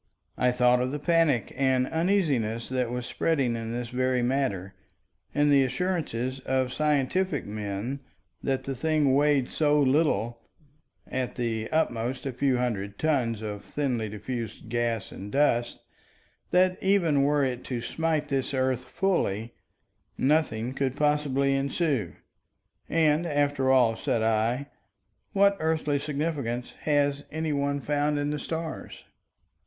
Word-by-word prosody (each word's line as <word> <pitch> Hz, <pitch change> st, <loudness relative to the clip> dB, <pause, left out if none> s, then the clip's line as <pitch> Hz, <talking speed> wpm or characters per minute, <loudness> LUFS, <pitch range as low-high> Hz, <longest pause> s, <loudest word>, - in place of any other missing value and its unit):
I 125 Hz, -, +2 dB
thought 125 Hz, 0 st, +3 dB
of 130 Hz, +1 st, -1 dB
the 150 Hz, -, -2 dB
panic 155 Hz, -, +2 dB
and 130 Hz, -1 st, +2 dB
uneasiness 150 Hz, -, 0 dB
that 125 Hz, -2 st, 0 dB
was 125 Hz, 0 st, -3 dB
spreading 135 Hz, -7 st, 0 dB
in 115 Hz, 0 st, -4 dB
this 120 Hz, 0 st, -4 dB
very 130 Hz, 0 st, 0 dB
matter, 120 Hz, -8 st, -1 dB, 0.6 s
and 145 Hz, 0 st, +2 dB
the 140 Hz, -1 st, +6 dB
assurances 130 Hz, -3 st, -2 dB
of 130 Hz, -1 st, -1 dB
scientific 150 Hz, +3 st, +1 dB
men 105 Hz, +5 st, -4 dB, 0.4 s
that 135 Hz, -1 st, -1 dB
the 135 Hz, -, -3 dB
thing 155 Hz, -1 st, +2 dB
weighed 145 Hz, -2 st, +3 dB
so 150 Hz, -1 st, +2 dB
little—at 135 Hz, -1 st, -2 dB
the 115 Hz, -3 st, -2 dB
utmost 125 Hz, -5 st, -1 dB
a 135 Hz, -, -2 dB
few 130 Hz, +1 st, +1 dB
hundred 100 Hz, -5 st, -2 dB
tons 120 Hz, -8 st, 0 dB
of 105 Hz, -1 st, -5 dB
thinly 125 Hz, -7 st, -2 dB
diffused 115 Hz, +1 st, -6 dB
gas 120 Hz, -2 st, -1 dB
and 100 Hz, +2 st, -8 dB
dust—that 150 Hz, +7 st, -1 dB
even 175 Hz, -7 st, +3 dB
were 145 Hz, +1 st, +3 dB
it 125 Hz, -1 st, -3 dB
to 125 Hz, -2 st, -3 dB
smite 155 Hz, +4 st, -1 dB
this 135 Hz, -1 st, -1 dB
earth 130 Hz, -1 st, 0 dB
fully, 120 Hz, -, -1 dB, 0.6 s
nothing 130 Hz, -5 st, +1 dB
could 135 Hz, -1 st, -1 dB
possibly 145 Hz, -2 st, +1 dB
ensue. 135 Hz, -, 0 dB, 0.8 s
And, 160 Hz, +1 st, +2 dB
after 145 Hz, -3 st, +1 dB
all, 120 Hz, -4 st, +4 dB
said 110 Hz, 0 st, -1 dB
I, 115 Hz, +5 st, +1 dB, 0.7 s
what 200 Hz, 0 st, +4 dB
earthly 155 Hz, -2 st, 0 dB
significance 140 Hz, -5 st, -3 dB
has 145 Hz, -1 st, +1 dB
any 155 Hz, 0 st, -2 dB
one 140 Hz, 0 st, 0 dB
found 145 Hz, +1 st, 0 dB
in 145 Hz, 0 st, -1 dB
the 150 Hz, -, -2 dB
stars? 160 Hz, +1 st, -5 dB
135 Hz, 130 wpm, -27 LUFS, 120-150 Hz, 0.8 s, the